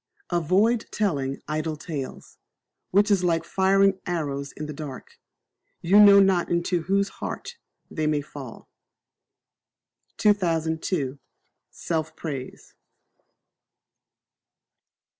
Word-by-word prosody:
Avoid 190 +8 +2
telling 140 -10 -2
Idle 155 +1 -2
Tales, 145 -4 -7 0.5
which 205 +3 +3
is 195 -3 +3
like 165 -2 +1
firing 195 +2 +3
arrows 140 -5 -3
in 150 - -7
the 150 - -6
dark: 140 -3 -9 0.6
you 195 +5 +4
know 200 -1 +9
not 190 -3 +3
into 170 0 0
whose 195 +4 +1
heart 480 - -6 0.3
they 155 -1 -1
may 150 -1 +1
fall. 140 -4 -10 1.5
2002. 160 -7 0 0.5
Self 160 -2 -3
Praise. 140 -5 -7
170 Hz, 95 wpm, -25 LUFS, 150-195 Hz, 1.5 s, know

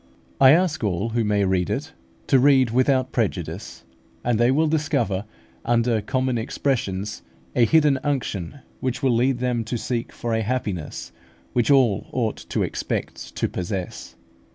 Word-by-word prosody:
I 135 - +8
ask 165 -5 +1
all 100 +2 0
who 115 0 0
may 105 -1 +2
read 95 -1 +1
it, 150 +4 -3 0.3
to 135 - +4
read 130 -3 +4
without 130 +1 +2
prejudice; 95 -4 -3 0.4
and 120 -2 +1
they 120 +1 +4
will 150 +5 +3
discover, 120 -10 0 0.4
under 115 -1 +2
common 130 +1 -1
expressions, 110 -5 -2 0.3
a 120 - +5
hidden 150 -1 +4
unction, 130 - -3 0.2
which 130 +2 -3
will 130 -2 +3
lead 125 +2 +2
them 125 -2 -1
to 120 +2 -2
seek 120 0 -3
for 120 -1 -4
a 110 - +1
happiness 95 - -3 0.4
which 120 -2 +1
all 130 -8 +3
ought 115 -4 -1
to - - 0
expect - - -4
to - - 0
possess. 90 0 -5
120 Hz, 155 wpm, -23 LUFS, 105-130 Hz, 0.4 s, I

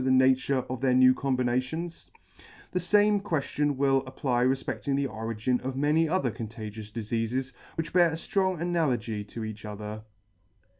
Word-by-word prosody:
the 130 - +1
nature 130 0 +3
of 130 -1 -5
their 130 -2 +3
new 130 0 +7
combinations? 130 +6 -2 0.6
The 180 - 0
fame 205 +3 +3
queftion 145 -5 0
will 135 -1 +3
apply 130 -2 0
refpeCting 130 0 -1
the 140 0 +1
origin 115 +1 -2
of 130 0 -4
many 150 +4 +2
other 160 -8 +1
contagious 110 -1 -7
difeafes, 115 +4 -2 0.2
which 165 - -4
bear 175 -1 +6
a - - -5
ftrong 185 +2 0
analogy 130 -11 0
to 110 +2 -7
each 110 -1 -6
other. 105 0 -6
130 Hz, 150 wpm, -28 LUFS, 115-155 Hz, 0.6 s, new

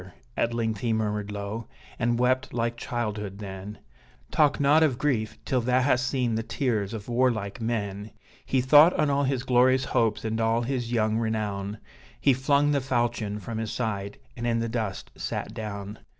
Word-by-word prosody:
at 120 - +1
length 110 -3 -1
he 115 +1 -1
murmured 105 -2 -1
low, 105 +3 -5 0.3
and 120 -1 +1
wept 130 +1 +1
like 120 0 0
childhood, 105 -5 -4
then 100 0 -7 0.5
Talk 145 -2 +3
not 145 +3 +5
of 145 -6 +3
grief 120 -7 0
till 130 -2 +1
thou 125 +2 +2
hast 130 -1 +2
seen 125 -4 0
the 110 - 0
tears 115 -4 -1
of 105 -2 -7
warlike 120 -4 0
men! 105 -3 -2 0.3
He 130 - +1
thought 145 +6 +7
on 150 -2 +1
all 140 0 +2
his 130 -2 0
glorious 130 +1 +4
hopes, 110 -1 +1
and 110 +1 -1
all 115 +1 +2
his 120 -2 -2
young 110 -1 +1
renown, 105 -2 -2 0.4
He 140 - +4
flung 140 +3 +2
the 140 -1 +2
falchion 120 -5 -1
from 110 +3 -5
his 110 -2 -3
side, 100 -4 -3 0.2
and 120 0 -3
in 115 -1 +2
the 115 0 -1
dust 110 -4 -3
sat 105 - -4
down. 105 -2 -6
115 Hz, 180 wpm, -27 LUFS, 105-130 Hz, 0.5 s, thought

